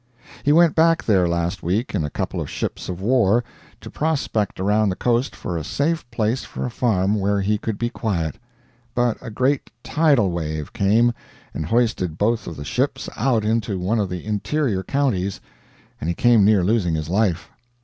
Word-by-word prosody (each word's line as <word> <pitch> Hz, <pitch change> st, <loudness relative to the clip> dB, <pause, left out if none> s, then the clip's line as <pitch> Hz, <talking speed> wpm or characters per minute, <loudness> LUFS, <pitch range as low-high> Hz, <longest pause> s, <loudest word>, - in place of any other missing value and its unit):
He 145 Hz, -, +2 dB
went 165 Hz, +1 st, +5 dB
back 165 Hz, 0 st, +3 dB
there 95 Hz, -5 st, +3 dB
last 85 Hz, +2 st, -1 dB
week 100 Hz, +9 st, -1 dB
in 95 Hz, -6 st, 0 dB
a 75 Hz, -, -2 dB
couple -, -, -3 dB
of -, -, -5 dB
ships -, -, -4 dB
of 90 Hz, 0 st, -5 dB
war, 120 Hz, 0 st, +3 dB, 0.4 s
to -, -, -9 dB
prospect 140 Hz, -11 st, -1 dB
around 105 Hz, +2 st, +2 dB
the 95 Hz, -, -1 dB
coast 120 Hz, +5 st, 0 dB
for 85 Hz, -, -4 dB
a 80 Hz, -, -4 dB
safe 145 Hz, -, -1 dB
place 115 Hz, +2 st, -1 dB
for -, -, -5 dB
a 125 Hz, -, -3 dB
farm 105 Hz, -4 st, +1 dB
where 100 Hz, +1 st, +1 dB
he 105 Hz, +2 st, 0 dB
could 110 Hz, -1 st, -3 dB
be 120 Hz, +2 st, -2 dB
quiet; 85 Hz, -, -2 dB, 0.6 s
but 120 Hz, -2 st, +2 dB
a 125 Hz, -, -7 dB
great 130 Hz, +5 st, 0 dB
"tidal 140 Hz, -, +3 dB
wave" 80 Hz, -3 st, -4 dB
came, 110 Hz, +4 st, +3 dB, 0.4 s
and 80 Hz, -, -4 dB
hoisted 110 Hz, -8 st, 0 dB
both 115 Hz, +3 st, 0 dB
of 85 Hz, -, -6 dB
the 70 Hz, -, -7 dB
ships -, -, -1 dB
out 115 Hz, -2 st, +1 dB
into 110 Hz, -2 st, 0 dB
one 95 Hz, +6 st, 0 dB
of 100 Hz, -3 st, 0 dB
the 90 Hz, 0 st, -5 dB
interior 110 Hz, +1 st, -1 dB
counties, 100 Hz, -7 st, -1 dB, 0.6 s
and 75 Hz, -, -4 dB
he 85 Hz, -, 0 dB
came 120 Hz, -1 st, +4 dB
near 100 Hz, -2 st, +4 dB
losing 90 Hz, -4 st, +1 dB
his 80 Hz, -1 st, -3 dB
life. 90 Hz, -1 st, 0 dB
105 Hz, 190 wpm, -22 LUFS, 90-120 Hz, 0.6 s, went